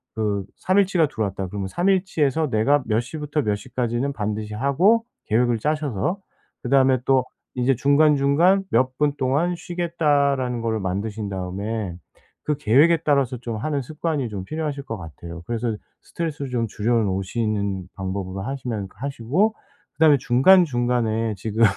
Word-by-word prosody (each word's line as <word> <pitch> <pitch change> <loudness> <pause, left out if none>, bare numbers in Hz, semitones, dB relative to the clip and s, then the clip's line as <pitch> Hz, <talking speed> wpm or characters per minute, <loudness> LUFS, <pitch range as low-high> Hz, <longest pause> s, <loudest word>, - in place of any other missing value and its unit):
그 105 -3 -1
3 185 +1 +1
일 200 - +5
치가 175 -4 +2
들어왔다. 100 -6 -3
그러면 100 0 -4
3 175 - 0
일 190 -2 +3
치에서 155 -4 0
내가 130 +6 +2
몇 110 0 +1
시부터 150 +3 -3
몇 105 -3 +1
시까지는 120 +4 -2
반드시 105 -1 -3
하고 165 - +3 0.2
계획을 120 +1 +2
짜셔서 150 - -1 0.4
그다음에 130 0 +3
또 130 -1 +3 0.3
이제 125 +2 +2
중간중간 150 - +4
몇 130 +2 +1
분 150 -1 +2
동안 145 +7 +1
쉬겠다라는 145 -8 0
거를 110 -1 -1
만드신 100 +3 -3
다음에 95 +1 -4 0.5
그 150 - 0
계획에 145 +10 +4
따라서 140 -4 +2
좀 115 -1 -5
하는 140 +5 -2
습관이 150 -1 -3
좀 100 -3 -5
필요하실 150 +1 -4
것 115 -5 -5
같아요. 85 0 -9
그래서 115 -1 -2 0.3
스트레스를 145 -5 -4
좀 115 -2 0
줄여 110 +3 -1
놓으시는 100 -1 -2
방법으로 95 0 -4
하시면 120 -4 -4
그 - - -25
하시고 140 - 0 0.4
그다음에 155 -1 +5
중간중간에 120 - +3
지금 110 +3 -1
125 Hz, 340 characters per minute, -23 LUFS, 110-150 Hz, 0.5 s, 일